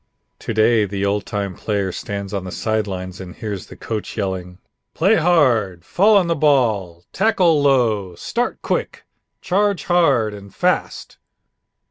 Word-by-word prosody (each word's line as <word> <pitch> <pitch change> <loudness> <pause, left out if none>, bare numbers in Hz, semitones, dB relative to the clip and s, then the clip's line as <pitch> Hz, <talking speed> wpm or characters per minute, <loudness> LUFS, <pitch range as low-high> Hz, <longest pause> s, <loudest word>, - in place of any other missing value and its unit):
To - - -5
day 110 0 +3
the 100 0 -3
old 100 +1 -1
time 100 -2 -3
player 100 0 -2
stands 100 +2 -5
on 100 -2 -2
the 90 - -7
side 110 +1 -1
lines 95 -1 -6
and 90 -2 -9
hears 105 -7 -6
the - - -12
coach 110 -2 -5
yelling: 90 -2 -3 0.4
"Play 195 +7 +3
hard! 120 - +2
Fall 205 +4 +4
on 190 - +3
the 170 - +1
ball! 110 - +1
Tackle 180 -8 +3
low! 115 -10 +2
Start 240 - -3
quick! - - -2 0.4
Charge 200 +1 +1
hard 140 -12 +2
and 100 -1 -12
fast!" - - -1
110 Hz, 150 wpm, -20 LUFS, 95-155 Hz, 0.4 s, Fall